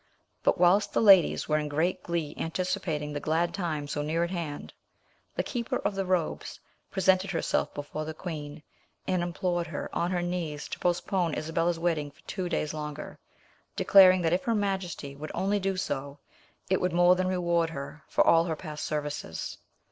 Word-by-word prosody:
But - - +2
whilst 180 +4 +4
the - - +2
ladies 195 -5 +6
were 155 0 +2
in 150 -1 -3
great 160 +5 0
glee 165 -4 -2
anticipating 165 -3 -2
the 145 - -2
glad 165 +3 0
time 160 -6 -2
so 145 - -2
near 160 +3 0
at 170 - -2
hand, 165 -5 -5 0.6
the - - 0
keeper 235 -2 -2
of - - -1
the 195 -1 -2
robes 180 -3 -1 0.3
presented 190 0 +2
herself 170 -4 0
before 145 +1 -4
the 160 0 -6
queen, 150 -3 -6 0.4
and 185 -2 +1
implored 175 0 -1
her 160 - -5
on 170 - +1
her 180 -1 0
knees 170 -4 -3
to - - -5
postpone 175 -1 0
Isabella's 165 +2 0
wedding 165 -3 0
for 145 - -24
two 185 -3 -4
days 155 -3 -1
longer, 150 -1 -6 0.6
declaring 185 -2 +7
that 165 0 +2
if 180 - 0
her 230 - +2
majesty 190 -8 -2
would 150 +2 -7
only 200 +2 +1
do 195 -1 -1
so, 140 -5 -3 0.5
it 190 -1 +1
would 180 -1 0
more 175 +1 +6
than 185 0 0
reward 170 -2 +1
her 150 0 -7
for - - +3
all 165 0 +5
her 165 -2 -1
past 155 -2 -7
services. 150 - -4
170 Hz, 180 wpm, -28 LUFS, 150-185 Hz, 0.6 s, declaring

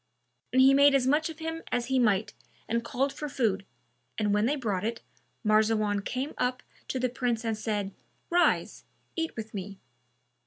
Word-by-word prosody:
And 260 +1 +5
he 270 +1 +7
made 280 0 +6
as 265 -2 +3
much 300 +5 +2
of 320 - -8
him 325 0 -4
as 245 -1 0
he 265 +1 +1
might 210 -3 +2 0.3
and 235 +1 0
called 270 +4 -1
for 300 - -5
food, 205 -7 0 0.5
and 210 -1 +1
when 210 +2 +3
they 290 - +1
brought 210 -9 -2
it, 230 +1 -3 0.4
Marzawan 215 -1 +3
came 265 +7 -3
up 250 0 0 0.2
to - - -2
the 255 - +2
Prince 240 -2 -1
and 225 -1 0
said, 210 -2 -2 0.4
"Rise, 350 0 +2 0.3
eat 325 -1 -2
with 220 -1 -7
me." 200 0 -6
235 Hz, 180 wpm, -28 LUFS, 215-275 Hz, 0.5 s, he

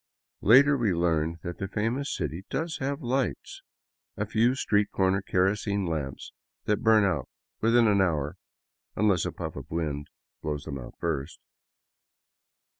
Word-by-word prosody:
Later 140 +7 +7
we 110 -9 +1
learned 85 -1 +1
that 85 0 -6
the 95 - -2
famous 115 +8 -1
city 80 +2 -3
does 160 0 -2
have 140 +2 -3
lights, 130 +1 -2 0.3
— - - -58
a - - -1
few 120 +4 +2
street 105 -5 +1
corner 95 +1 +1
kerosene 100 +2 0
lamps 75 -5 -4 0.3
that 105 - 0
burn 110 -2 +5
out 85 -9 -1 0.3
within 115 +1 +4
an 100 -2 +4
hour, 75 -6 0 0.6
unless 100 -5 +2
a - - -3
puff - - -6
of - - -8
wind 75 -3 -3 0.3
blows 75 -1 -3
them 70 -3 -5
out - - -10
first. 80 -2 -3
95 Hz, 150 wpm, -27 LUFS, 80-115 Hz, 0.6 s, Later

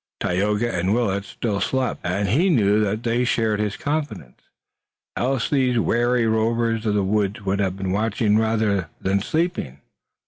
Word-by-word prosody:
Tayoga 105 +6 0
and 90 +4 +1
Willet 100 -5 0
still 105 -1 -3
slept, 130 -1 -1
and 95 +3 -1
he 165 - +3
knew 105 - +3
that 105 +2 -2
they 120 +1 +1
shared 110 -3 0
his 105 -1 -2
confidence, 145 - -4 0.7
else 130 -1 0
these 130 -4 +1
wary 120 +1 +2
rovers 115 0 0
of 105 - +1
the 100 - +2
woods 100 +1 0
would 100 +1 0
have 95 -1 -1
been 95 -1 -3
watching 105 +1 +1
rather 110 -5 0
than 95 +1 0
sleeping. 155 - -2
110 Hz, 160 wpm, -22 LUFS, 100-120 Hz, 0.7 s, he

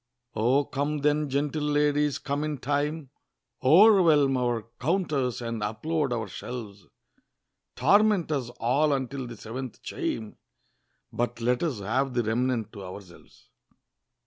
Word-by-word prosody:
O 130 +6 +2
come 145 +1 -2
then, 150 0 +1
gentle 145 +3 -1
ladies, 150 -1 +1
come 145 +1 -3
in 155 -1 -2
time, 145 +2 -2 0.5
O'erwhelm 160 -4 +6
our 120 -3 -1
counters, 140 - 0
and 115 -1 -4
unload 140 +7 -1
our 115 -3 -2
shelves; 105 -1 -8 0.9
Torment 200 - +3
us 135 -5 -1
all 140 +6 +2
until 135 -1 -3
the 120 -1 -9
seventh 120 +4 -7
chime, 110 -2 -4 0.8
But 120 0 -2
let 125 +1 +1
us 140 -11 -2
have 125 +6 -1
the 120 - +2
remnant 115 0 -1
to 100 - -8
ourselves! 90 -9 -12
135 Hz, 125 wpm, -27 LUFS, 115-150 Hz, 0.9 s, O'erwhelm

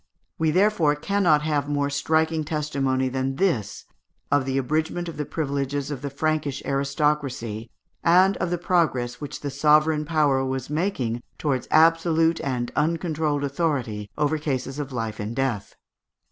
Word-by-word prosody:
We 160 -1 +2
therefore 180 -3 +3
cannot 165 -2 +2
have 145 -2 0
more 145 -1 0
striking 160 +2 +1
testimony 140 -4 -1
than 130 +1 -2
this 135 - -1 0.5
of 145 -2 +3
the 135 0 -1
abridgment 155 +6 -1
of 165 - -6
the 150 -2 -3
privileges 140 -2 -2
of 135 -3 -5
the 140 - -3
Frankish 145 -1 -1
aristocracy, 140 -5 -1 0.3
and 185 +3 +5
of 175 - -1
the 175 - 0
progress 160 -9 0
which 145 - -6
the 145 - -3
sovereign 150 +2 +3
power 150 -4 +2
was 130 +1 -3
making 145 - -1 0.2
towards 135 -4 -1
absolute 165 0 +4
and 125 -3 -2
uncontrolled 155 -2 0
authority 135 -8 -2
over 150 +1 +1
cases 135 -2 -3
of 140 -2 -4
life 115 -3 -4
and 105 +3 -4
death. 130 -7 -2
145 Hz, 145 wpm, -24 LUFS, 135-160 Hz, 0.5 s, and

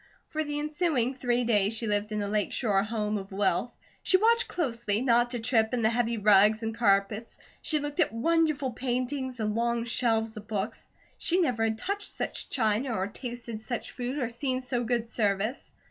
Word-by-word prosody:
For 310 0 -2
the 295 -1 -4
ensuing 295 -4 0
three 245 -2 0
days 215 -2 +2
she 225 - -1
lived 210 0 -1
in 210 -1 -1
a - - -2
Lake 210 0 0
Shore 205 -5 +2
home 210 0 -2
of 195 0 -10
wealth. 200 +1 +1 0.3
She 375 - +4
watched 465 +4 +3
closely 235 - -1
not 240 -1 +3
to 245 -1 -3
trip 225 0 +2
in 235 - -1
the 220 - +4
heavy 235 -1 0
rugs 210 +1 +5
and 225 0 -3
carpets. 210 0 +1 0.2
She 310 - +1
looked 290 +2 -4
at 335 - +3
wonderful 300 +2 +1
paintings 255 +1 -2
and 215 -1 0
long 235 +1 0
shelves 225 -2 +1
of 215 0 -9
books. 210 0 -3 0.3
She 355 +2 +4
never 245 -10 +1
had 220 0 -1
touched 400 - -3
such - - -4
china, 225 +1 0
or 190 - 0
tasted 235 0 -6
such 240 +1 -4
food 250 +3 -4
or 255 -5 0
seen 255 +2 -2
so 245 -1 -1
good 235 -1 -1
service. 215 +1 -1
235 Hz, 190 wpm, -28 LUFS, 215-260 Hz, 0.3 s, rugs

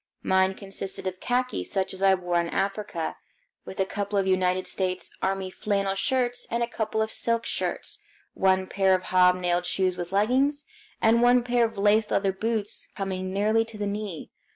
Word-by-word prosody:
Mine 190 0 +3
consisted 195 -1 -6
of 185 -1 -3
khaki, 250 +1 -1
such 190 -1 -2
as 190 - -7
I 195 -1 +5
wore 175 -1 0
in 170 - -4
Africa, 195 -4 -2 0.5
with 190 - -9
a 190 - +3
couple 200 +1 -3
of 195 - +2
United 185 -1 +1
States 185 0 -2
Army 190 0 -1
flannel 195 -1 -1
shirts 245 +4 0
and 235 +1 0
a - - -1
couple 220 -2 -1
of 220 - -4
silk 230 0 0
shirts, - - -3 0.3
one 190 0 +2
pair 190 0 +3
of 185 - -3
hob 180 0 +4
nailed 180 -1 0
shoes 185 -1 0
with 175 0 -5
leggings, 265 +8 +2 0.4
and 230 +1 +5
one 245 0 +5
pair 240 -1 +2
of 225 - -5
laced 210 +2 +3
leather 195 -1 +1
boots 220 +1 -2
coming 185 -2 -3
nearly 215 +3 +2
to 225 -1 -10
the 205 - -2
knee. 200 -4 -5
195 Hz, 185 wpm, -26 LUFS, 185-220 Hz, 0.5 s, I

